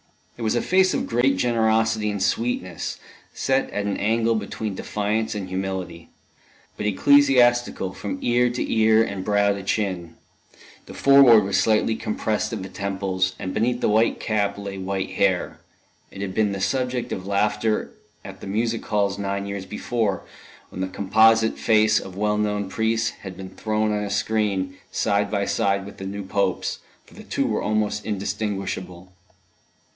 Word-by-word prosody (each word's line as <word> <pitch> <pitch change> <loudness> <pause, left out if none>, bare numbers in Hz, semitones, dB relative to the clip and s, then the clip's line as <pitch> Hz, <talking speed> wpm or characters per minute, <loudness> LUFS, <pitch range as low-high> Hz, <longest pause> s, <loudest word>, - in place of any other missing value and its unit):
It - - -11
was 110 +1 +1
a 120 - 0
face 185 0 +3
of - - -1
great 120 +4 +2
generosity 110 -2 +1
and 100 -2 -2
sweetness, 95 -4 -2 0.3
set 135 0 0
at 105 - -3
an 100 - -1
angle 115 +2 +1
between 110 0 -3
defiance 105 +3 -2
and 100 -3 -4
humility, 95 -3 -4 0.7
but 105 - -3
ecclesiastical 120 -3 +3
from 100 -2 -5
ear 120 +1 +3
to 120 +1 -2
ear 110 0 +5
and 100 -4 -4
brow 100 0 +2
to 100 - -6
chin; 95 -4 -2 0.7
the - - -10
forehead 135 -6 +7
was 95 0 +1
slightly 110 +1 +2
compressed 110 0 -2
at - - -4
the 95 - -7
temples, 95 -2 -2
and 95 - -5
beneath 120 +2 0
the - - +2
white 110 +2 +2
cap 100 -2 -1
lay 100 -1 -6
white 95 0 -3
hair. - - 0 0.5
It 100 - -9
had 95 -2 -4
been 105 -1 +1
the 100 - -4
subject 125 +1 -1
of 95 0 -5
laughter 105 +2 0 0.3
at - - -10
the - - -7
music 115 +3 -1
halls 100 -2 0
nine 100 0 -2
years 100 -1 -5
before, 105 -2 -2 0.5
when 95 - -7
the 95 - -1
composite 110 +4 +3
face 110 0 +4
of 95 0 -10
well 105 0 +1
known 105 -1 -1
priests 110 +2 0
had 95 -2 -8
been 95 -1 -8
thrown 110 +1 -1
on 105 0 -1
a 100 - -4
screen, 100 -3 -1
side 100 0 +1
by 100 -1 0
side 100 0 0
with 100 - -11
the 95 - -6
new 100 +1 -5
Pope's, 95 -1 -1 0.3
for - - -20
the - - -11
two - - -1
were - - -1
almost 105 -1 -1
indistinguishable. 95 -3 -4
105 Hz, 170 wpm, -23 LUFS, 95-110 Hz, 0.7 s, forehead